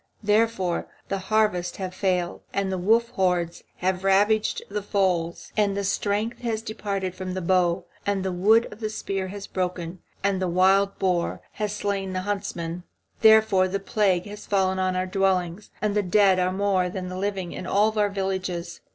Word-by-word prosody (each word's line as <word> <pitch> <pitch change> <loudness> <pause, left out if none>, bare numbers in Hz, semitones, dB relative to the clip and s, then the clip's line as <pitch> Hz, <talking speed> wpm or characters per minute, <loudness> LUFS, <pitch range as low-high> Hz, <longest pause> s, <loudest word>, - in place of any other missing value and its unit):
Therefore 210 -4 +1 0.2
the 195 - -1
harvests 210 -5 +1
have 185 -2 -4
failed, 180 -2 -1
and 195 -1 0
the 190 - -1
wolf 225 +5 +3
hordes 180 -7 0 0.2
have 185 0 0
ravaged 205 +3 +2
the 210 +1 -3
folds, 185 -5 -1
and 200 -2 +1
the 200 - -1
strength 205 +3 -1
has 225 -3 -2
departed 200 -4 -3
from 185 0 -5
the - - -1
bow, 180 0 +1 0.2
and 200 -2 -1
the 190 - 0
wood 215 +6 +4
of 210 - -14
the 215 -2 -2
spear 195 -3 -3
has 200 +1 -7
broken, 180 -1 -3 0.2
and 195 -1 +1
the 185 - +1
wild 190 +3 +3
boar 180 -2 0
has 210 -1 -3
slain 195 -2 -2
the 185 - -1
huntsman. 180 -4 -3 0.4
Therefore 220 -4 +6
the 195 +2 -2
plague 195 -3 +1
has 210 0 -9
fallen 190 -2 +1
on 185 0 0
our 185 0 0
dwellings, 185 0 0
and 210 -1 +1
the 210 - +2
dead 190 0 +4
are 180 0 +1
more 190 -2 +1
than 185 0 -5
the 185 - -6
living 190 -2 -2
in 185 - -6
all 215 +2 +2
our 205 -1 +3
villages. 190 -3 -3
190 Hz, 180 wpm, -25 LUFS, 185-205 Hz, 0.4 s, Therefore